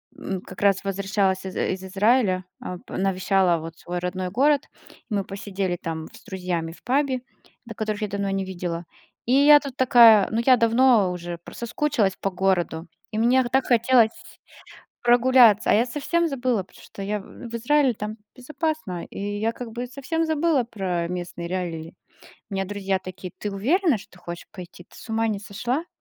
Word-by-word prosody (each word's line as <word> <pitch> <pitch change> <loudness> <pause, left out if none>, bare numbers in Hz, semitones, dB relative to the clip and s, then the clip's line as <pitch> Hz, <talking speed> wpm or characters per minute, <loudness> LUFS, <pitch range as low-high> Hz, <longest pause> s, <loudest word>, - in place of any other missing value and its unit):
м, 190 -2 -5
как 185 - -11
раз 195 -1 +3
возвращалась 195 -1 0
из, 190 - -6
э, - - 0
из 185 0 -7
Израиля, 195 -1 +2 0.2
а, 180 - -5
п - - -9
навещала 190 -1 +2
вот 165 +1 -8
свой 175 0 -5
родной 180 +1 -3
город, 280 +8 +2 0.4
мы 205 -3 0
посидели 195 -2 -3
там 160 -1 -4
в - - -17
с - - -18
друзьями 180 -3 -3
в 165 - -16
пабе, 265 0 +1 0.4
да, 230 - -8
которых 215 -1 -3
я - - 0
давно 200 0 -2
не 195 0 -1
видела, 175 -2 -4 0.4
и 245 - +1
я 290 +2 +8
тут 280 -3 -8
такая. 230 -5 +7
Ну, 225 +1 +1
я 260 - +7
давно 230 -4 +4
уже 175 -1 -5
про - - -11
соскучилась 235 -4 0
по 195 - -1
городу, 180 -3 0 0.2
и 215 - -4
мне 245 +3 +4
х 240 - -4
так 265 +1 +2
хотелось 240 -1 +4 0.9
прогуляться, 240 -3 +5
а - - +5
я 225 - +4
совсем 330 +6 0
забыла, 250 -7 0
потому - - -19
что 200 - -10
я 205 +1 -2
в, - - -14
э, 240 - -10
в - - -9
Израиле 270 +3 +3
там 210 +1 -5 0.2
безопасно, 270 - -3
и - - -11 0.2
я 225 +2 0
как 235 0 -8
бы 240 +2 -4
совсем 280 +6 -2
забыла 315 -4 +1
про 185 -7 -3
местные 175 -1 -5
реалии. 170 -3 -4 0.6
У - - -5
меня 195 0 0
друзья 195 -1 -1
такие: 185 0 -9
"Ты 210 - -3
уверена, 285 - +2
что - - -15
ты 180 - -16
хочешь 175 -1 -8
пойти? 180 -1 -11
Ты - - -22
с - - -12
ума 225 0 0
не 210 -2 -1
сошла?". 245 - -3
205 Hz, 195 wpm, -24 LUFS, 185-245 Hz, 0.9 s, я